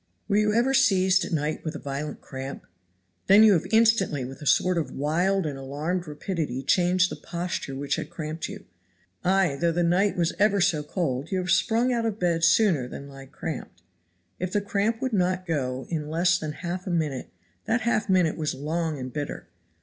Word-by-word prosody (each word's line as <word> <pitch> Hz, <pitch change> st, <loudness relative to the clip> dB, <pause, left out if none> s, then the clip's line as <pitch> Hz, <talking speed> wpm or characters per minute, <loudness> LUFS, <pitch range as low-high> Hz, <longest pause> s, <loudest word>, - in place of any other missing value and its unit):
Were 200 Hz, -, +2 dB
you 210 Hz, 0 st, +3 dB
ever 240 Hz, +5 st, +2 dB
seized 195 Hz, -7 st, +4 dB
at -, -, -7 dB
night 155 Hz, -1 st, -1 dB
with 155 Hz, 0 st, -4 dB
a -, -, -5 dB
violent 140 Hz, +2 st, -5 dB
cramp? 135 Hz, 0 st, -7 dB, 0.6 s
Then 200 Hz, +3 st, +8 dB
you 215 Hz, -2 st, +7 dB
have 165 Hz, -, 0 dB
instantly 220 Hz, -, +3 dB
with 135 Hz, +3 st, -9 dB
a 150 Hz, -, -5 dB
sort 180 Hz, +3 st, +3 dB
of 160 Hz, -, -3 dB
wild 175 Hz, +6 st, 0 dB
and 140 Hz, -3 st, -4 dB
alarmed 155 Hz, +6 st, -3 dB
rapidity 150 Hz, -4 st, -3 dB
changed 180 Hz, +4 st, +3 dB
the -, -, -4 dB
posture 170 Hz, -5 st, -4 dB
which 140 Hz, +1 st, -2 dB
had -, -, -5 dB
cramped 155 Hz, 0 st, -5 dB
you; -, -, -9 dB, 0.6 s
ay 185 Hz, -5 st, +2 dB
though 170 Hz, -1 st, +3 dB
the 175 Hz, +1 st, 0 dB
night 180 Hz, +4 st, +2 dB
was 170 Hz, -2 st, +1 dB
ever 205 Hz, -1 st, +4 dB
so 175 Hz, -5 st, +2 dB
cold 150 Hz, -3 st, -2 dB
you 190 Hz, -, 0 dB
have 180 Hz, -1 st, -1 dB
sprung 240 Hz, +2 st, +2 dB
out 230 Hz, -1 st, 0 dB
of 215 Hz, -2 st, -3 dB
bed 170 Hz, -4 st, 0 dB
sooner 170 Hz, -, +4 dB
than 140 Hz, +2 st, -9 dB
lie 135 Hz, -1 st, -11 dB
cramped. 130 Hz, -, -7 dB, 0.6 s
If 185 Hz, 0 st, -3 dB
the 205 Hz, -, +2 dB
cramp 210 Hz, +3 st, -1 dB
would 260 Hz, -3 st, -1 dB
not 185 Hz, -1 st, +1 dB
go 130 Hz, -6 st, -2 dB
in 150 Hz, -3 st, -2 dB
less 175 Hz, +2 st, +2 dB
than 155 Hz, -1 st, -4 dB
half 180 Hz, +2 st, -4 dB
a -, -, -1 dB
minute 155 Hz, -7 st, -1 dB, 0.4 s
that 225 Hz, +3 st, +1 dB
half 220 Hz, -2 st, 0 dB
minute 180 Hz, -4 st, +3 dB
was 155 Hz, -2 st, -2 dB
long 160 Hz, +2 st, -2 dB
and 130 Hz, -1 st, -6 dB
bitter. 145 Hz, -1 st, -5 dB
170 Hz, 200 wpm, -26 LUFS, 150-195 Hz, 0.6 s, Then